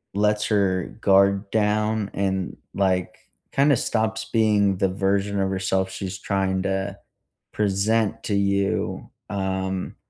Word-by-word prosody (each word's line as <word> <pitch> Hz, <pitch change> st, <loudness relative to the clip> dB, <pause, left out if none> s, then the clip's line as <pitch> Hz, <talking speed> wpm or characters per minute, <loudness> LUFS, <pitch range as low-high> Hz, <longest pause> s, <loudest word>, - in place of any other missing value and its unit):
lets 105 Hz, +1 st, +2 dB
her 95 Hz, -4 st, +1 dB
guard 100 Hz, +1 st, +4 dB
down 105 Hz, 0 st, +1 dB
and, 95 Hz, -2 st, -1 dB, 0.2 s
like, 95 Hz, -2 st, 0 dB, 0.3 s
kinda 140 Hz, +1 st, +4 dB
stops 110 Hz, -1 st, -1 dB
being 105 Hz, -4 st, +3 dB
the 95 Hz, +1 st, +1 dB
version 100 Hz, +1 st, 0 dB
of 95 Hz, 0 st, +1 dB
herself 95 Hz, 0 st, 0 dB
she's 95 Hz, -1 st, -5 dB
trying 95 Hz, -1 st, -1 dB
to 95 Hz, +1 st, -2 dB, 0.5 s
present 105 Hz, +1 st, 0 dB
to 105 Hz, -, -2 dB
you, 100 Hz, 0 st, 0 dB, 0.2 s
um, 95 Hz, -1 st, -2 dB
100 Hz, 120 wpm, -24 LUFS, 95-105 Hz, 0.5 s, guard